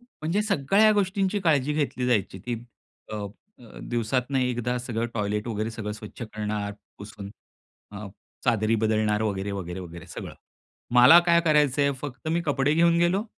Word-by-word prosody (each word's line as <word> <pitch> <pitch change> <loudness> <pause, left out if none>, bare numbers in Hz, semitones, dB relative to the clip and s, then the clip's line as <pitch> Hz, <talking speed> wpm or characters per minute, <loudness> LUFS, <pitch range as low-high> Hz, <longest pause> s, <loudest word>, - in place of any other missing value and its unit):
म्हणजे 205 -5 -3
सगळ्या 200 +3 +3
गोष्टींची 200 0 0
काळजी 150 -4 +2
घेतली 140 -4 -1
जायची 100 -5 0
ती 120 - -1 0.6
अ, - - -3
अ, 110 - -10
दिवसातनं 125 +3 -1
एकदा 125 -1 -1
सगळं 120 -1 -3
टॉयलेट 105 +1 -2
वगैरे 110 0 -2
सगळं 105 -2 -5
स्वच्छ 105 +2 -10
करणार 105 -2 -4 0.3
पुसून 100 -1 -9 0.6
अ, 105 0 -7 0.4
चादरी 115 -2 +2
बदलणार 110 -1 +1
वगैरे, 100 -2 -2
वगैरे, 95 -2 -5
वगैरे 85 -2 -10
सगळं. - - -8 0.6
मला 125 +8 +9
काय 170 0 +5
करायचंय 145 -3 +3
फक्त 145 +1 -6
मी 170 +2 +1
कपडे 145 0 +1
घेऊन 170 +1 +4
गेलो. 175 +4 +2
120 Hz, 150 wpm, -26 LUFS, 105-155 Hz, 0.6 s, मला